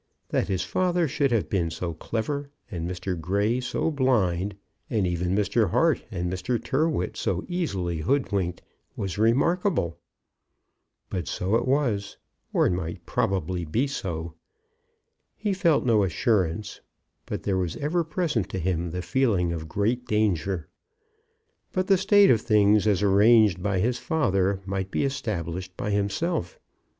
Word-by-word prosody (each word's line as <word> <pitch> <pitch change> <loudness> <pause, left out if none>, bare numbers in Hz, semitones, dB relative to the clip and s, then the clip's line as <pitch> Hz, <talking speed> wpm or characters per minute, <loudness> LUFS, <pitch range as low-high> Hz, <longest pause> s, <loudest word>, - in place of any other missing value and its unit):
That - - 0
his 95 -2 -1
father 180 -2 +1
should 140 0 0
have 115 -4 +1
been 85 -4 0
so 85 +1 -4
clever, 140 - -3 0.2
and 85 -2 -3
Mr. 90 +1 -3
Grey 100 +8 +1
so 130 +5 -1
blind, 105 - +1 0.3
and 110 -5 +1
even 90 +1 0
Mr. 105 0 +2
Hart 160 - +2
and 90 -5 -3
Mr. 95 +7 -1
Tyrrwhit 150 +7 0
so - - -2
easily 95 - -2
hoodwinked, 95 - 0 0.3
was 95 0 -4
remarkable. 120 - +2 1.1
But 90 -4 -3
so 95 +3 -2
it 120 +2 +1
was, 120 -8 0 0.3
or - - +3
might 85 -1 -4
probably 90 -2 -1
be 110 - 0
so. 85 - -4 1.0
He 210 -2 -1
felt 170 -8 +2
no 115 -4 +4
assurance, 100 -1 0 0.5
but - - -4
there 95 -2 0
was 90 -3 -2
ever 165 +4 0
present 155 - -1
to 95 - -4
him 85 -1 -1
the 90 +2 -4
feeling 100 -8 +1
of 80 -1 -6
great 115 +8 -1
danger. 95 -5 0 1.1
But 185 -1 +1
the 195 0 +4
state 205 0 +6
of 110 - +3
things 105 -1 +4
as 105 -2 +2
arranged 105 -1 +5
by 100 0 0
his 120 +6 +1
father 100 - +1
might 95 -1 -3
be - - 0
established 90 - -4
by 105 - -2
himself. 100 - -1
100 Hz, 145 wpm, -26 LUFS, 90-130 Hz, 1.1 s, state